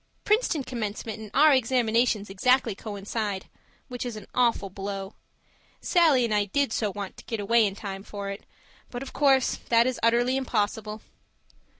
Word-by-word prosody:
Princeton 420 - +1
commencement 220 -2 -5
and 215 -1 -8
our 300 +2 +7
examinations 235 -4 +2
exactly 235 +4 +2
coincide 205 -1 -4 0.4
which 250 -2 -5
is 245 -3 -5
an 210 -2 -9
awful 235 -6 +1
blow. 195 +1 -5 0.7
Sallie 315 -9 +4
and 225 - -1
I 205 -1 +2
did 270 +4 0
so 210 -3 0
want 200 -1 -7
to - - -13
get 225 - -4
away 220 +2 +3
in 195 - -5
time 195 -2 -6
for 200 0 -6
it, 200 - -8 0.5
but 245 +1 -5
of 270 - -10
course 270 -3 +3
that 230 0 +5
is 255 -1 -1
utterly 240 +3 +3
impossible. 215 -3 -2
225 Hz, 165 wpm, -26 LUFS, 205-250 Hz, 0.7 s, our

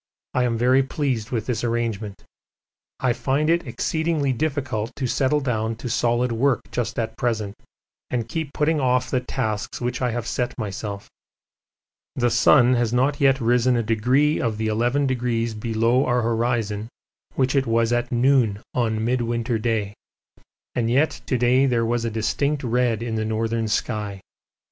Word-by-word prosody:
I 125 - +2
am 115 -2 0
very 125 +3 +4
pleased 130 -4 -2
with 115 -4 -2
this 120 -2 -2
arrangement. 115 -4 -2 0.8
I 125 -2 +2
find 145 +5 0
it 170 +1 +1
exceedingly 160 -4 0
difficult 130 -6 -2
to 135 - -3
settle 135 +4 +1
down 115 -4 -1
to 120 +2 -6
solid 120 +1 +1
work 125 +3 +2
just 120 -2 -2
at 115 -1 -2
present 110 -4 -1 0.6
and 120 -3 -2
keep 160 +1 -4
putting 150 +1 +1
off 125 -1 +1
the 130 - +2
tasks 110 -4 -3
which 120 0 -3
I 125 - +1
have 120 0 -3
set 125 +1 -2
myself. 105 -2 -5 1.1
The 120 -2 +1
sun 120 +2 +5
has 120 -2 +1
not 130 +4 +1
yet 135 -1 +4
risen 125 +1 +3
a 115 - 0
degree 125 +8 +2
of 115 -3 -1
the 110 0 -1
eleven 120 +6 +1
degrees 120 -3 -1
below 115 +3 +1
our 120 -1 +2
horizon 115 -2 -1 0.5
which 130 +1 +1
it 135 -2 +2
was 115 +1 +2
at 120 +1 -1
noon 120 -4 +3
on 110 -3 0
Midwinter 120 -1 0
Day, 110 -3 -1 0.8
and 115 -2 0
yet 140 +6 +1
to 130 - +1
day 125 +3 +3
there 120 -3 +1
was 120 0 0
a - - 0
distinct 130 +7 -1
red 120 -2 +1
in 115 -1 -3
the 110 - 0
northern 110 +1 -1
sky. 105 -2 -2
120 Hz, 165 wpm, -23 LUFS, 115-130 Hz, 1.1 s, sun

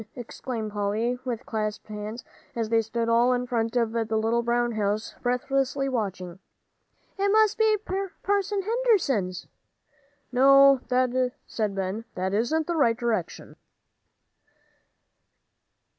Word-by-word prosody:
exclaimed 235 -2 -5
Polly, 215 +4 -1
with 245 -2 -4
clasped 215 -1 -3
hands, 215 +2 -7 0.3
as 225 -2 -2
they 230 - +3
all - - +4
stood 230 +2 +2
in 245 0 -2
front 230 -1 -1
of 230 -2 +1
the 225 -1 -1
little 225 +2 +1
brown 240 0 0
house, 215 0 -2
breathlessly 270 +2 0
watching, 190 -8 -3 0.8
"it 400 +1 +2
must 435 0 +4
be 440 -1 +3 0.5
Parson 400 0 0
Henderson's." 370 - +1 0.9
"No," 275 +1 +6 0.7
said 210 -3 -2
Ben, 195 +4 -3
"that 185 +1 -2
isn't 245 +10 +1
the 345 - -2
right 235 -7 +3
direction." 230 -7 -3
235 Hz, 115 wpm, -26 LUFS, 215-270 Hz, 0.9 s, No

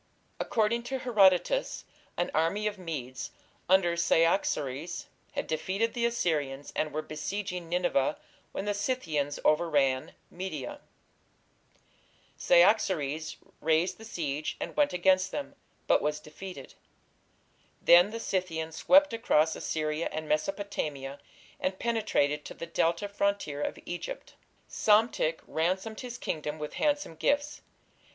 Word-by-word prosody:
According 225 +1 +1
to 265 +2 -2
Herodotus, 225 - +3 0.3
an 175 - 0
army 165 +7 +1
of 210 -2 -2
Medes 135 -8 -5 0.4
under 185 -2 +4
Cyaxares 165 -3 +1 0.3
had - - -2
defeated 190 +8 -1
the 235 -1 +1
Assyrians 150 -11 -1
and 155 -1 0
were 155 +1 -3
besieging 180 +3 -4
Nineveh 170 -5 +1 0.3
when 195 - -4
the 205 - +1
Scythians 170 - -1
overran 145 -5 +2 0.2
Media. 175 -6 -5 1.6
Cyaxares 170 -6 +3 0.2
raised 160 +5 +1
the - - -10
siege 155 -8 -3
and - - -5
went 295 -1 +3
against 185 +1 +3
them, 290 - -4 0.3
but - - +4
was 150 0 -1
defeated. 150 -1 -10 1.1
Then 175 +3 +7
the 230 +1 -5
Scythians 165 -6 -2
swept 290 -2 +5
across 160 -9 +2
Assyria 155 +1 -2
and 155 0 -4
Mesopotamia, 150 -5 -2 0.4
and 185 0 -1
penetrated 210 -11 +1
to - - -8
the - - -6
Delta 170 +3 0
frontier 200 -7 -1
of - - -2
Egypt. 175 - -6 0.3
Psamtik 210 -7 +2
ransomed 190 +7 -1
his 245 -2 -6
kingdom 155 -8 -3
with 150 -1 -6
handsome 290 - +1
gifts. 290 - 0
175 Hz, 120 wpm, -29 LUFS, 155-210 Hz, 1.6 s, Then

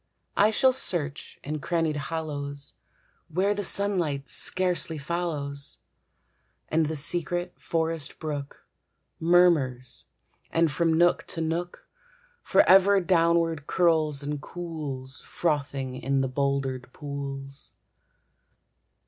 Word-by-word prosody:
I 205 +2 +5
shall 260 +4 +4
search 170 - 0
in 150 +2 -3
crannied 165 0 0
hollows, 145 -2 -4 0.5
Where 190 +5 +1
the 205 0 -3
sunlight 175 -10 +1
scarcely 180 -3 +2
follows, 145 -3 -3 0.9
And 160 0 +2
the 160 - -3
secret 175 +4 -1
forest 165 -2 -2
brook 145 -3 -6 0.5
Murmurs, 160 -8 +3 0.4
and 165 -2 +2
from 165 +4 +1
nook 175 +1 +3
to 165 - -4
nook 170 +2 -3 0.5
Forever 195 +1 +5
downward 165 -3 +2
curls 155 -5 +2
and 145 0 -3
cools, 145 -6 -6
Frothing 140 -5 -2
in 135 +1 0
the 135 - 0
bouldered 135 -1 -1
pools. 140 -1 -6
155 Hz, 100 wpm, -27 LUFS, 140-175 Hz, 0.9 s, I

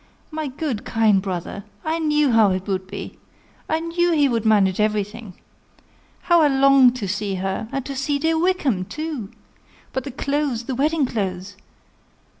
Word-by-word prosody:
My 310 -1 -3
good, 270 -4 -4
kind 215 -3 +2
brother! 190 +1 -5 0.2
I 320 +1 0
knew 300 -3 +2
how 225 -3 +5
it 185 0 -2
would 190 -2 -2
be 200 +1 -8 0.5
I 315 - +1
knew 340 +1 0
he 290 -3 +4
would 230 -4 -1
manage 200 -3 +3
everything. 210 -1 -2 0.9
How 345 -1 +4
I 305 - +5
long 270 -2 +5
to 240 -6 -4
see 200 0 -2
her! 190 +4 -3
and 275 -2 -3
to 275 - -5
see 285 +2 0
dear 320 +2 +1
Wickham 310 - +1
too! 300 - -5 0.6
But 260 - -2
the 280 - -6
clothes, 275 -2 -2
the 260 - -4
wedding 295 +3 +1
clothes! 195 -4 -4
250 Hz, 165 wpm, -22 LUFS, 205-300 Hz, 0.9 s, how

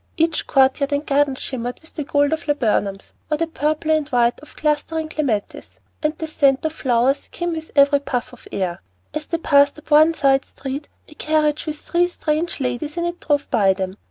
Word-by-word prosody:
Each 325 -1 +1
court 265 0 +4
yard 280 0 -1
and 285 +1 -1
garden 280 -1 +2
shimmered 245 -2 -5
with 320 - -12
the 300 - -3
gold 285 +1 +2
of 320 +1 -4
laburnums 210 -8 0 0.2
or 305 - +1
the 330 - +1
purple 310 0 -1
and 310 -2 +1
white 240 -1 +2
of 300 - -15
clustering 310 +1 -1
clematis; 260 -10 -3 0.2
and 305 0 -1
the 320 - -4
scent 275 -2 +2
of 315 - -1
flowers 260 -1 +1
came 345 0 -3
with 320 0 -5
every 280 0 +5
puff 250 -3 -3
of 250 - -14
air. 180 -3 -2 0.3
As 305 0 -4
they 335 - -1
passed 285 -3 +4
up 305 - -14
the 310 +2 +5
side 270 -1 +3
street, 275 +2 -6 0.2
a - - -14
carriage 305 0 0
with 305 -1 -3
three 350 +3 +1
strange 325 -1 -2
ladies 270 +5 -3
in 340 - 0
it 345 0 -3
drove 290 -2 0
by 200 -6 +4
them. 190 0 -4
295 Hz, 205 wpm, -21 LUFS, 265-315 Hz, 0.3 s, every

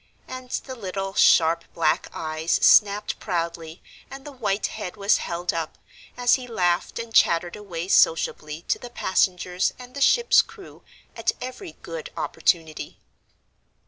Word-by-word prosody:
And 255 -1 -8
the 260 - -4
little, 195 -4 -5
sharp 165 -2 +4
black 155 -2 +1
eyes 155 +1 -3
snapped 205 0 +4
proudly 170 -2 -4 0.3
and 270 0 -10
the 295 - -8
white 210 -7 -2
head 210 -3 -6
was 200 +1 +3
held 175 +1 -3
up, 165 -2 -4 0.4
as 245 -1 +3
he 250 - -9
laughed 180 -6 0
and 230 -1 -6
chattered 170 -2 +3
away 185 -5 -6
sociably 160 -3 +2
to - - -1
the 245 - -9
passengers 185 -4 0
and 250 0 -12
the 280 - -6
ship's 475 - +5
crew, 445 -4 -14 0.3
at - - 0
every 255 +8 -7
good - - -7
opportunity. 160 -3 -1
195 Hz, 145 wpm, -24 LUFS, 170-245 Hz, 0.4 s, ship's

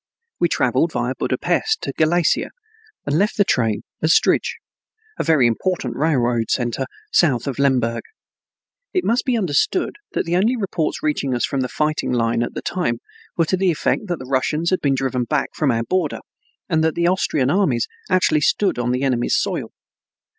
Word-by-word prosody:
We - - +2
traveled - - +1
via - - -1
Budapest 440 0 -1
to - - -3
Galicia, 165 +2 +2 0.6
and 145 +3 +1
left 205 +2 +1
the 205 - +5
train 115 - 0 0.2
at 155 - +1
Strij, - - +3 0.7
a - - +1
very 155 -6 +4
important 170 +10 -1
railroad 125 -7 +1
center 120 -2 -1 0.2
south 130 -9 +3
of 140 -1 -4
Lemberg. 125 -4 +1 0.9
It 365 - +1
must 235 +2 +1
be 250 -3 +1
understood 205 - 0 0.2
that - - -1
the 170 +1 0
only 215 +8 +2
reports 185 -7 -2
reaching 140 -4 0
us 120 - +1
from 140 - -2
the 125 - -2
fighting 150 -3 -1
line 115 -1 +1
at 120 - -3
that - - -6
time 160 -11 -1 0.4
were 165 - +3
to 185 - 0
the 190 0 +2
effect 175 +5 0
that 175 -2 -2
the 130 - -9
Russians 150 +6 0
had 185 - +1
been 140 -2 +2
driven 130 -2 -1
back 150 +3 0
from 150 - 0
our 115 -2 +1
border, 175 +2 -1 0.5
and 160 -1 +1
that 160 -1 +1
the 170 - +1
Austrian 150 -7 +1
armies 150 - +1 0.2
actually 185 -5 +3
stood 190 -1 +1
on 120 0 -1
the 125 +2 -1
enemy's 125 -3 +1
soil. - - -2
150 Hz, 180 wpm, -21 LUFS, 125-180 Hz, 0.9 s, the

